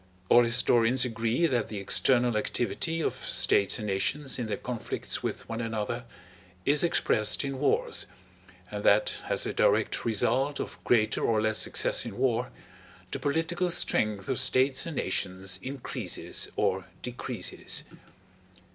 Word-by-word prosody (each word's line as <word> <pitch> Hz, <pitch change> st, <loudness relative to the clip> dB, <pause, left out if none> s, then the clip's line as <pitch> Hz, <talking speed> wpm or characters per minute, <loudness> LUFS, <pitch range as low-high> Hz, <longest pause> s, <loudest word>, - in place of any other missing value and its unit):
All 120 Hz, -, +7 dB
historians 120 Hz, +1 st, +3 dB
agree 115 Hz, +6 st, 0 dB
that 125 Hz, -8 st, 0 dB
the 105 Hz, -, -6 dB
external 120 Hz, +4 st, +3 dB
activity 125 Hz, -, -1 dB
of -, -, 0 dB
states 100 Hz, -, +1 dB
and 105 Hz, -, -5 dB
nations 130 Hz, +8 st, 0 dB
in 120 Hz, -, -3 dB
their 110 Hz, -, -2 dB
conflicts 120 Hz, -3 st, -3 dB
with -, -, -4 dB
one 115 Hz, 0 st, -4 dB
another 115 Hz, +1 st, -3 dB, 0.6 s
is 145 Hz, +3 st, +4 dB
expressed 110 Hz, -10 st, +2 dB
in 135 Hz, -1 st, -4 dB
wars, 145 Hz, -, 0 dB, 0.6 s
and 105 Hz, 0 st, -5 dB
that 105 Hz, +1 st, +3 dB
as -, -, +1 dB
a -, -, -3 dB
direct -, -, +2 dB
result 130 Hz, +5 st, +1 dB
of -, -, -6 dB
greater 110 Hz, -3 st, +2 dB
or 110 Hz, -2 st, +2 dB
less 110 Hz, 0 st, +1 dB
success -, -, +1 dB
in -, -, -7 dB
war 125 Hz, -1 st, 0 dB, 0.6 s
the -, -, -3 dB
political 165 Hz, +4 st, -1 dB
strength 105 Hz, -, +1 dB
of 130 Hz, -, -1 dB
states 130 Hz, +4 st, +2 dB
and 165 Hz, -, -5 dB
nations 95 Hz, -3 st, -1 dB
increases 130 Hz, +2 st, -3 dB
or -, -, 0 dB, 0.2 s
decreases. -, -, -1 dB
120 Hz, 140 wpm, -28 LUFS, 110-135 Hz, 0.6 s, All